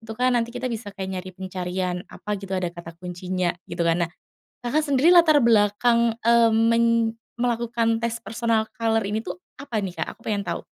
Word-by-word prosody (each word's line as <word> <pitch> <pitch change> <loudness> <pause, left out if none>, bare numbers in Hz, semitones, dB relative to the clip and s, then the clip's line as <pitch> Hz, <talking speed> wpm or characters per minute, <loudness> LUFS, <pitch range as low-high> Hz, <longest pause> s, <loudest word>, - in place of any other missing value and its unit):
itu 225 -1 -8
kan 250 +1 +2
nanti 235 0 -1
kita 255 0 -3
bisa 215 -3 -6
kayak 190 -1 -5
nyari 185 +1 -9
pencarian 185 -1 -3
apa 210 0 -5
gitu 195 -1 -8
ada 185 -1 -1
kata 170 -1 -9
kuncinya 180 0 -2 0.2
gitu - - -3
kan 170 +1 +2
nah, - - -23 0.5
Kakak 300 +6 +1
sendiri 285 +3 +4
latar 330 -4 +6
belakang, 235 +1 +3
eee, 235 0 +5
men 230 +1 +4 0.5
melakukan 235 -1 0
tes 235 0 -1
personal 225 +1 0
color 225 -1 +1
ini 215 +2 -2
tuh 180 -3 -6 0.2
apa 255 -5 -4
nih, 190 -3 -4
Kak? - - -3
Aku - - -42
pengen 205 -2 0
tau. 170 -2 -4
225 Hz, 190 wpm, -24 LUFS, 185-235 Hz, 0.5 s, latar